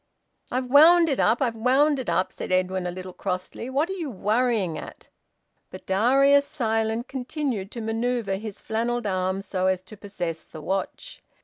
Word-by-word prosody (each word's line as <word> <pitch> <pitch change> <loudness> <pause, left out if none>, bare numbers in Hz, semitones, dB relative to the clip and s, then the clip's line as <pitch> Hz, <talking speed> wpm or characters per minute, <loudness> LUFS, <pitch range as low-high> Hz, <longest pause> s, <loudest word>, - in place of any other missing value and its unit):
"I've 255 +1 -1
wound 325 +6 +7
it 275 - 0
up! 230 +5 +3
I've 240 -3 0
wound 270 +5 +3
it 255 - -4
up!" 185 - +1
said - - -6
Edwin, 185 0 0
a - - -3
little 185 0 -8
crossly. 185 +6 -4
"What 280 +5 +1
are 385 - -4
you 340 -6 -4
worrying 215 -4 0
at?" - - -10 0.6
But - - -11
Darius, 275 +8 +4
silent, 225 -3 -1
continued 255 -6 -3
to 235 - -5
manoeuvre 225 -2 -1
his 210 0 -7
flannelled 235 +1 -2
arm 190 0 -1
so 185 -1 -1
as 185 -1 0
to 200 +3 -12
possess 175 -5 -5
the 160 - -11
watch. 195 - -4
225 Hz, 175 wpm, -25 LUFS, 190-260 Hz, 0.6 s, wound